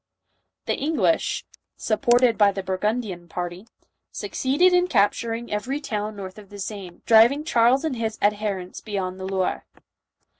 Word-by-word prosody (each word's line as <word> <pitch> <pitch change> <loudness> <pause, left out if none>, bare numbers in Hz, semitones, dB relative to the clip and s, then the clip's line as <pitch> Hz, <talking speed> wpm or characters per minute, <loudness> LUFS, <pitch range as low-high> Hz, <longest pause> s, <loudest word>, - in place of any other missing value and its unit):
The - - 0
English, 320 +2 0 0.3
supported 240 +2 +3
by 205 -2 +5
the 195 -1 -5
Burgundian 190 -1 -2
party, 175 +4 -6 0.4
succeeded 295 +8 +1
in 360 0 +4
capturing 230 - 0
every 255 +7 -2
town 215 -6 -4
north 195 0 -8
of 205 -2 -15
the 205 - -10
Seine, 195 -3 -7
driving 235 +6 +6
Charles 250 0 +3
and 305 -5 -1
his 220 -1 -2
adherents 205 -3 -1
beyond 190 -3 -4
the 190 - -5
Loire. 190 -1 -2
215 Hz, 140 wpm, -24 LUFS, 195-245 Hz, 0.4 s, driving